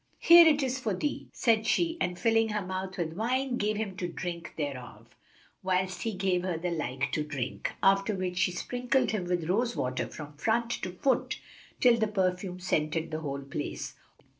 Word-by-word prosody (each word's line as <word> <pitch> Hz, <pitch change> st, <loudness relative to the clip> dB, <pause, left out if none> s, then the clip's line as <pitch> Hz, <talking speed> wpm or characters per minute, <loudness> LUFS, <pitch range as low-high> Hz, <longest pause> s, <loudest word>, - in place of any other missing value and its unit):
"Here 340 Hz, 0 st, +9 dB
it 295 Hz, -2 st, +4 dB
is 260 Hz, 0 st, -1 dB
for 220 Hz, -6 st, -1 dB
thee," 290 Hz, +10 st, -3 dB
said 225 Hz, -2 st, +2 dB
she 335 Hz, +6 st, +1 dB
and 180 Hz, 0 st, 0 dB
filling 225 Hz, 0 st, +3 dB
her 210 Hz, -2 st, -2 dB
mouth 190 Hz, +1 st, -4 dB
with 165 Hz, -3 st, -2 dB
wine, 245 Hz, +6 st, 0 dB
gave 210 Hz, -1 st, 0 dB
him 205 Hz, -3 st, -3 dB
to 180 Hz, -, -2 dB
drink 175 Hz, 0 st, -6 dB
thereof, 135 Hz, -5 st, -6 dB, 0.5 s
whilst 185 Hz, 0 st, 0 dB
he 225 Hz, -, -2 dB
gave 185 Hz, -2 st, +1 dB
her 180 Hz, -2 st, -2 dB
the 175 Hz, +2 st, -2 dB
like 135 Hz, -4 st, -2 dB
to 150 Hz, -, 0 dB
drink; 135 Hz, -4 st, -4 dB
after 195 Hz, +1 st, +4 dB
which 185 Hz, -1 st, -2 dB
she 180 Hz, -, +3 dB
sprinkled 245 Hz, +8 st, 0 dB
him 210 Hz, -5 st, -2 dB
with 175 Hz, -2 st, -1 dB
rose 235 Hz, +6 st, +1 dB
water 130 Hz, +1 st, -1 dB
from 150 Hz, -1 st, -9 dB
front 230 Hz, +7 st, +1 dB
to 185 Hz, -, -4 dB
foot, 255 Hz, +7 st, 0 dB, 0.4 s
till 245 Hz, -2 st, +6 dB
the 220 Hz, -, +2 dB
perfume 185 Hz, -2 st, -1 dB
scented 160 Hz, -2 st, -1 dB
the 155 Hz, -, -2 dB
whole 140 Hz, -3 st, -4 dB
place. 140 Hz, +1 st, -5 dB
185 Hz, 190 wpm, -29 LUFS, 170-225 Hz, 0.5 s, Here